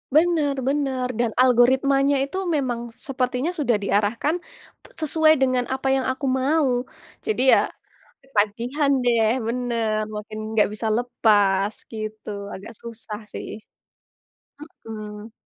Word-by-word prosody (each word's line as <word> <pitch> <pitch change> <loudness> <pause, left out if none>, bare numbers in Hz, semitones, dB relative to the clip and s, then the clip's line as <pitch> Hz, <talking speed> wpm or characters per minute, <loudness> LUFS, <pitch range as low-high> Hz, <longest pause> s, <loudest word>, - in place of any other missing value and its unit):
Bener 310 -4 +3
bener, 270 -3 0
dan 235 -2 +1
algoritmanya 265 +3 +4
itu 290 +7 -6 0.2
memang 240 -4 -2
sepertinya 255 +4 -2
sudah 265 -9 +1
diarahkan 210 - 0 0.4
p - - -27 0.2
sesuai 315 +1 +4
dengan 255 -2 +1
apa 265 +1 -2
yang 265 - 0
aku 260 +2 -5
mau. 270 +3 +2 0.6
Jadi 435 - 0
ya - - +3 0.5
ketagihan 245 +4 0
deh 230 -2 +3 0.2
bener, 230 -3 -1
makin 215 +1 -6
enggak 215 - +4
bisa 220 +1 -3
lepas 205 -4 +2 0.2
gitu, 215 0 -6 0.2
agak 200 +4 -9
susah 220 -2 -7
sih. - - -6 1.4
Mhm. 215 0 -8
245 Hz, 115 wpm, -23 LUFS, 220-275 Hz, 1.4 s, algoritmanya